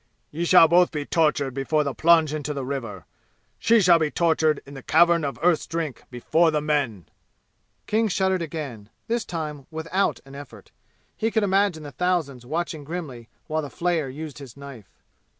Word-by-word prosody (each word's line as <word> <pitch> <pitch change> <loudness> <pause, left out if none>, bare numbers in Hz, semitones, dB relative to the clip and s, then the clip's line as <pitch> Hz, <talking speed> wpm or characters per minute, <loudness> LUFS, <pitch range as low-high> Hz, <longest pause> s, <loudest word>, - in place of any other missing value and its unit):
"Ye 165 +3 -3
shall 170 -2 +7
both 175 +2 +4
be 150 -2 -4
tortured 150 -5 +1
before 145 +3 0
the 140 -2 -3
plunge 160 -1 +4
into 150 -1 -4
the 135 -2 -4
river! 115 - -5 0.5
She 230 -1 +4
shall 175 -3 +5
be 155 -2 +1
tortured 160 -2 +1
in 140 - -12
the 135 - -9
Cavern 170 +2 +4
of 140 -1 -3
Earth's 175 -2 +2
Drink 165 -5 -4
before 160 +7 +2
the 155 -1 0
men!" 145 - -1 0.8
King 220 +1 +1
shuddered 190 -2 0
again, 140 -10 -6 0.2
this 235 0 -2
time 150 -5 -6
without 165 +4 -1
an 135 - -14
effort. 130 -8 -12 0.4
He 225 - -1
could 220 -1 0
imagine 195 -4 +1
the 145 - -8
thousands 155 -9 -2
watching 160 0 -3
grimly 140 -8 -7 0.2
while 155 0 -2
the 145 - -7
flayer 170 -4 -1
used 145 -1 -8
his 135 -2 -12
knife. 140 -7 -11
155 Hz, 175 wpm, -24 LUFS, 140-170 Hz, 0.8 s, shall